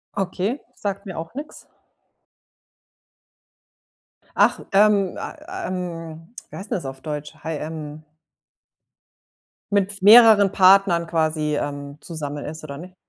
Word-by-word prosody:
Okay, 195 +6 -2 0.2
sagt 200 0 -4
mir 190 -4 -7
auch 165 0 -6
nix. 295 +2 -8 2.7
Ach, - - +3
ähm, 200 -1 +3
ah, 360 +5 -7
ähm, 165 -1 -6 0.2
wie - - -11
heißt 200 +2 -9
'n - - +1
das 175 - -4
auf 135 0 -7
Deutsch, 150 0 -6
hai 160 -1 -3
ähm 155 0 -7 1.7
Mit 200 0 +1
v 200 - -9
mehreren 210 -1 +8
Partnern 190 -3 +5
quasi, 155 -2 0
ähm, 145 0 -5
zusammen 145 -3 -6
ist 155 +1 -8
oder 140 -2 -7
nicht? 185 +2 -11
175 Hz, 125 wpm, -22 LUFS, 155-200 Hz, 2.7 s, mehreren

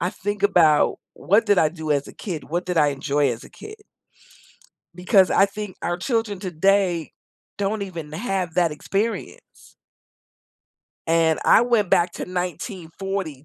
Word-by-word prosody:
I 175 +3 0
think 205 0 -5
about, 165 -7 +4 0.2
what 205 +5 +2
did 205 -2 +4
I 155 - +4
do 160 -2 -6
as 145 -1 +1
a - - -11
kid? 170 -7 -6
What 175 +3 -3
did 180 -1 -2
I 150 - +4
enjoy 140 0 0
as 115 -1 -6
a - - -14
kid? 430 - -11 1.2
Because 185 +1 +3
I 195 - +4
think 210 -1 -7
our 175 - -1
children, 225 0 -2
today, 185 -2 +1 0.5
don't 205 +1 -1
even 170 -6 -7
have 185 -2 -3
that 175 -2 +2
experience. 200 +9 -5 1.3
And 165 -1 +2
I - - +6
went 235 -5 +1
back 175 0 +3
to - - -5
1940, 180 - -5
180 Hz, 150 wpm, -22 LUFS, 160-200 Hz, 1.3 s, I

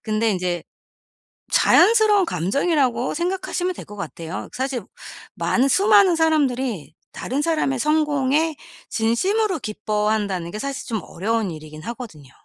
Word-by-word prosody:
근데 220 0 0
인제 180 -3 -2 0.9
자연스러운 430 -4 +5
감정이라고 260 - 0
생각하시면 360 +1 -2
될 - - -9
것 210 -1 -11
같아요. 165 -1 -6
그 - - -9
사실 260 -5 -2 0.5
많은, 260 +3 +1
수많은 400 - +5
사람들이 265 - 0 0.2
다른 265 +4 -3
사람의 305 -5 0
성공에 300 +1 +1 0.4
진심으로 370 - +1
기뻐한다는 210 -4 -1
게 215 - -5
사실 275 0 -4
좀 225 -3 -2
어려운 215 +2 -2
일이긴 155 -1 -10
하거든요. 220 - -8
250 Hz, 325 characters per minute, -22 LUFS, 210-320 Hz, 0.9 s, 자연스러운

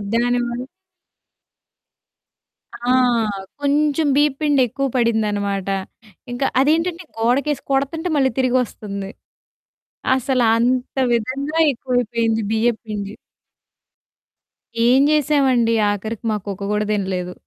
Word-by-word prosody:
దానివల్ల 245 +1 0 2.1
ఆ! 240 +1 -5 0.7
కొంచెం 295 +1 +1
బీయప్పిండి 290 -1 +2
ఎక్కువ 275 +4 -2
పడిందనమాట. 205 -4 0 0.6
ఇంక 245 - -6 0.2
అదేంటంటే 330 +4 +1
గోడకేసి 260 +5 +1
కొడుతుంటే 300 +6 0
మళ్ళీ 265 -3 +2
తిరిగొస్తుంది. 215 -6 -1 1.1
అసలంత 250 0 +1 0.2
విధంగా 275 +7 -2
ఎక్కువైపోయింది 235 -3 -1
బియ్యప్పిండి. 220 -3 -2 1.7
ఏం 255 +3 +5
చేశామండి? 270 -6 +2 0.2
ఆఖరికి 215 +2 -5
మా - - 0
కుక్క 200 -1 -5
కూడా 210 0 0
తినలేదు. 185 -3 -2
245 Hz, 80 wpm, -20 LUFS, 220-275 Hz, 2.1 s, ఏం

